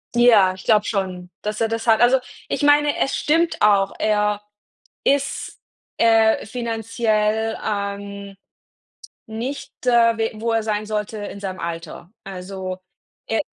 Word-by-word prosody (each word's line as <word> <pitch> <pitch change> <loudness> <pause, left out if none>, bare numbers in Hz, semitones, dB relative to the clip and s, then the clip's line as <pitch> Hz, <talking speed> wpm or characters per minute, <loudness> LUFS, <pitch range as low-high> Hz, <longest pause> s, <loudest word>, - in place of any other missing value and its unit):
Ja, 225 -6 +6
ich 185 0 -13
glaube 210 -1 +4
schon, 185 -3 -3
dass 210 +1 -4
er 225 - +2
das 225 +1 -3
hat. 220 -1 +5
Also, 250 +2 +5 0.3
ich - - -2
meine, 290 0 +4
es 270 - 0
stimmt 330 +3 +1
auch. 200 -2 +4
Er 210 -1 +1 0.6
ist, 275 0 -1 0.4
äh, 225 -1 +4
finanziell, 225 -1 -1
ähm, 200 -1 -4 0.9
nicht, 235 +6 -5
äh, 235 -2 +4
we 225 0 0
wo 230 0 0
er 225 -1 +1
sein 215 -1 -2
sollte 210 0 -3
in 205 -1 -7
seinem 190 -2 -5
Alter. 170 +2 -6
Also, 185 0 -6 0.5
er 225 - +1
215 Hz, 135 wpm, -21 LUFS, 200-230 Hz, 0.9 s, Ja